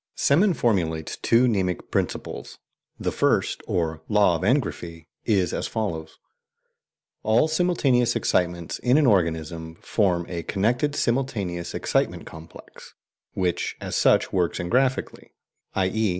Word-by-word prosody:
Semon 175 +6 +3
formulates 85 - 0
two 120 +2 +3
"mnemic 95 -6 -1
principles." - - -3 0.4
The - - -1
first, - - +1
or 80 -2 -1
"Law 105 -4 +4
of 80 - -4
Engraphy," 90 - -1 0.2
is 95 -6 +1
as - - -2
follows: 80 -8 -4 1.0
"All 110 +7 +3
simultaneous 155 -7 +2
excitements 85 -2 -1
in 125 +3 +3
an 155 - +4
organism 80 - 0
form 90 -5 0
a 85 -2 -4
connected 120 - 0
simultaneous 105 -11 -2
excitement - - -1
complex, 80 +1 -13 0.4
which 90 -2 -1
as - - -5
such - - +3
works 90 -3 0
engraphically, 130 +9 -1 0.4
i.e. 100 +3 +1
95 Hz, 120 wpm, -24 LUFS, 85-125 Hz, 1.0 s, Law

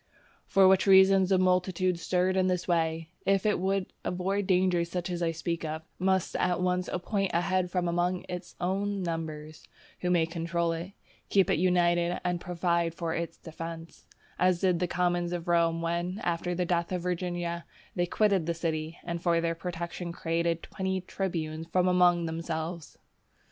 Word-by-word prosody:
For 195 -1 +5
which 190 +1 +4
reason 190 0 +7
a 190 - +5
multitude 185 -1 +1
stirred 185 +2 +1
in 185 -1 +3
this 180 -1 -1
way, 165 -2 0
if 195 0 +2
it 210 - +2
would 190 +1 -1
avoid 190 +2 -1
dangers 180 -2 +2
such 180 +1 -3
as 175 0 -3
I 170 - +2
speak 165 +1 -3
of, 160 0 -4 0.2
must 190 0 +1
at 180 -1 +1
once 180 0 0
appoint 195 +2 -1
a 170 - +3
head 185 0 0
from 180 -1 -1
among 175 +1 0
its 180 0 -7
own 195 +2 -1
numbers, 155 -2 -5 0.4
who 180 - -1
may 175 -2 +3
control 170 0 -1
it, 170 +4 -5 0.4
keep 195 -3 +3
it - - +2
united, 175 -1 +2
and 175 -1 0
provide 170 -1 0
for 165 -2 -2
its 170 0 -4
defence; 165 0 -8 0.3
as 180 -1 +3
did 180 -3 +2
the 180 - 0
commons 175 0 0
of 175 -1 -4
Rome 165 -1 +2
when, 175 +3 -2
after 175 +1 -1
the 180 0 0
death 170 0 0
of 180 -2 -2
Virginia, 175 -1 -2 0.3
they 175 -2 +1
quitted 195 -4 +2
the 170 - 0
city, 160 0 -3
and 170 -1 -4
for 170 -1 +2
their 165 0 0
protection 170 0 -5
created 170 0 -1
twenty 190 -1 -2
tribunes 165 -4 -3
from 180 +1 +3
among 180 -1 +4
themselves. 165 0 -4
175 Hz, 175 wpm, -29 LUFS, 170-185 Hz, 0.4 s, reason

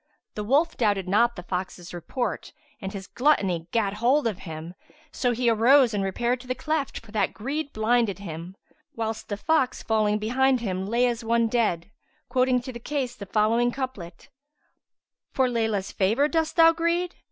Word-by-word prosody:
The 210 - -4
wolf 290 +9 +2
doubted 205 -5 +1
not 235 +5 +3
the 180 - -8
fox's 180 -1 -5
report 215 +7 -4 0.3
and 190 -1 -4
his 195 -2 -7
gluttony 195 - +1
gat 205 -2 0
hold 245 +7 +2
of 215 -5 -1
him; 160 +2 -7 0.4
so 245 - 0
he 240 +1 -1
arose 235 +2 +5
and 200 -1 0
repaired 235 +6 -1
to 250 - -13
the 255 - -1
cleft, 310 -2 -2
for 210 - -14
that 205 -3 0
greed 285 +6 -3
blinded 220 -1 +1
him; 175 -1 -8 0.4
whilst 220 -1 -4
the 205 - -2
fox 265 +1 +1
falling 215 -1 +1
behind 255 +4 +2
him 190 -4 -3
lay 235 +3 +2
as 240 -1 -1
one 230 0 +2
dead, 210 -6 0 0.4
quoting 255 0 +2
to 255 +1 -7
the 235 - -7
case 255 -1 -3
the 200 -3 -9
following 225 +4 +2
couplet, 225 -11 -6 1.0
"For 260 -1 +2
Layla's[FN#151] 220 -5 -1
favour 220 +9 +2
dost 320 0 -1
thou 330 -1 +7
greed? 335 +2 0
230 Hz, 175 wpm, -25 LUFS, 200-255 Hz, 1.0 s, thou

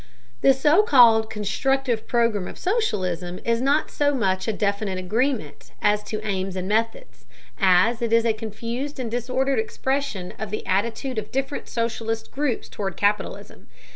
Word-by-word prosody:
The 270 - +5
so 300 +8 +4
called 230 - +6
constructive 230 +3 -1
program 230 -6 +1
of - - -9
socialism 185 - -1
is 230 0 +1
not 280 +4 +1
so 290 -1 +1
much 190 -5 0
a - - +2
definite 200 -1 -1
agreement 225 +8 -2
as 210 0 +2
to 215 0 -5
aims 190 -2 -2
and 185 0 -3
methods, 225 - -2 0.3
as 195 +5 +4
it 230 -1 -1
is 230 0 +4
a 225 - +3
confused 230 +6 -5
and 235 -3 -3
disordered 255 +2 0
expression 225 -4 -2
of 215 - -4
the 215 - -4
attitude 225 +5 -1
of 210 - -8
different 270 +2 -3
socialist 225 -1 -3
groups 280 -5 -2
toward 195 -4 -5
capitalism. 205 0 -2
225 Hz, 155 wpm, -24 LUFS, 205-265 Hz, 0.3 s, called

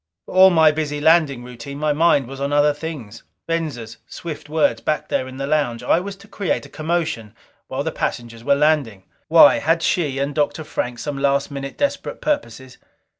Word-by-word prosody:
For - - -10
all 190 +1 +8
my 160 -3 +5
busy 150 -1 -3
landing 150 -5 +3
routine, 125 +3 -9
my 150 0 0
mind 150 -4 +3
was 135 +1 -8
on 140 +1 -1
other 145 0 +3
things. 145 -8 -7 0.2
Venza's 150 -9 -4
swift 155 -3 -8
words 155 0 +1
back 155 - -2
there 130 - -1
in 130 0 -9
the 135 - -3
lounge. 140 -5 0
I 165 - +3
was 195 +2 -6
to 195 - -17
create 200 -4 -2
a - - -13
commotion 155 -9 -3 0.3
while - - -3
the - - -2
passengers 115 -1 -4
were 140 +2 +3
landing. 140 -10 +1 0.2
Why? - - +7
Had 165 +1 +1
she 150 -7 0
and 140 +1 -1
Dr. 150 +1 -1
Frank 125 -5 -4
some 140 +2 -5
last 140 0 +1
minute 140 0 -6
desperate 285 -1 -2
purposes? 210 - -3
145 Hz, 190 wpm, -21 LUFS, 130-160 Hz, 0.3 s, all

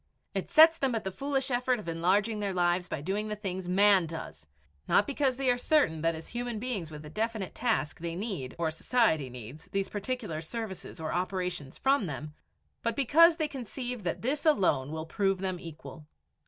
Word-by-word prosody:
It - - -3
sets 325 +1 +7
them 265 -3 +1
at 225 - -2
the 190 - -3
foolish 270 +4 -2
effort 250 +1 +2
of 210 - -9
enlarging 195 +6 +1
their 200 -2 -2
lives 175 0 +2
by 140 - -4
doing 200 +7 -2
the 210 - -3
things 190 -3 -4
man 195 -1 +5
does 80 - -8 0.4
not 205 - +4
because 275 -2 0
they 270 -1 -1
are 245 - 0
certain 245 - +2
that 165 0 +1
as 160 - -9
human 240 -1 -3
beings 210 -8 -3
with 150 -1 -9
a - - -8
definite 220 -2 -2
task 225 -11 -1
they 165 0 -4
need 185 - -4
or 165 -2 0
society 160 - +1
needs 125 +6 -10
these 195 0 -2
particular 205 -6 -3
services 190 0 -6
or 160 -1 -3
operations 180 -5 -2
from 270 -7 +2
them, 150 +1 -6 0.5
but 230 -1 -1
because 320 +6 +6
they 310 - 0
conceive 250 -2 -5
that 175 +1 -3
this 280 +5 0
alone 185 - +3
will 160 0 -4
prove 195 +3 +1
them 185 -1 -3
equal. 160 -2 -10
195 Hz, 195 wpm, -30 LUFS, 165-245 Hz, 0.5 s, sets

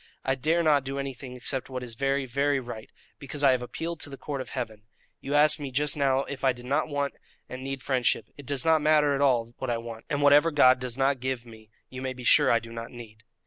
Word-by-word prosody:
I 130 - +2
dare 160 +6 +1
not 150 -4 +3
do 135 +1 -5
anything 135 -2 -6
except 130 +2 -2
what 130 -1 -5
is 120 -2 -7
very, 135 +2 0
very 140 +2 +1
right, 120 -3 -8 0.3
because 145 +1 -4
I 135 - +7
have 130 -1 +1
appealed 165 +7 -5
to - - -2
the 135 - -9
Court 140 -1 -5
of - - -8
Heaven. 110 -5 -5 0.4
You 140 +2 -3
asked 150 +1 +5
me 145 -2 -5
just 145 +3 +1
now 135 -2 +2
if 140 -1 -8
I 135 -1 +4
did 120 0 -12
not 145 +5 0
want 145 -2 -2 0.3
and 130 +1 -8
need 135 -1 -5
friendship; 125 -4 +1
it 140 -3 -12
does 140 +1 -2
not 160 -1 +4
matter 150 -1 +4
at 140 - -1
all 120 -4 +2
what 130 - -3
I 120 - 0
want, 115 -1 -8
and 145 0 -1
whatever 145 +3 +6
God 130 -4 +5
does 125 -1 -3
not 135 0 +1
give 130 -1 -3
me 110 -2 -15 0.2
you 130 0 -7
may 130 0 -3
be 125 -1 -10
sure - - +5
I 115 - +5
do 115 0 -8
not 115 0 -6
need." 110 -3 -12
135 Hz, 255 wpm, -27 LUFS, 125-145 Hz, 0.4 s, I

